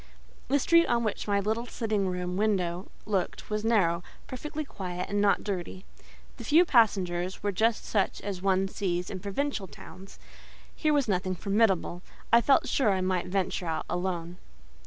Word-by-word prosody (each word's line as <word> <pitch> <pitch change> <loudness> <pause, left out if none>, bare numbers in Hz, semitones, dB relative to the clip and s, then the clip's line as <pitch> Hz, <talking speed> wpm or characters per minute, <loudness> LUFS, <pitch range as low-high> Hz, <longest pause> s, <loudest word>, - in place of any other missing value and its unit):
The 280 - +3
street 335 +4 +4
on 235 -1 +1
which 215 -1 -3
my 200 -1 +2
little 220 +4 -1
sitting 215 -5 -1
room 180 0 -3
window 190 -3 0 0.2
looked 200 0 -2
was 210 0 -1
narrow, 190 -7 +2 0.2
perfectly 300 +4 -5
quiet, 180 -6 -5
and 205 0 +1
not 205 -1 +3
dirty: 190 -1 -5 0.5
the 240 - -8
few 315 +9 +5
passengers 190 - +2
were 205 - +1
just 220 +4 +1
such 200 -3 0
as 195 -3 -5
one 195 0 +2
sees 180 -2 -2
in 190 - -5
provincial 205 +2 -2
towns: 185 +5 -13 0.6
here 310 - +1
was 285 -4 +2
nothing 185 -2 0
formidable; 195 -3 +1 0.3
I 235 - +8
felt 275 +4 +3
sure 260 -6 +2
I 190 -1 0
might 185 -1 0
venture 185 -1 -1
out 160 -1 -2
alone. 175 -1 -3
195 Hz, 165 wpm, -28 LUFS, 180-225 Hz, 0.6 s, I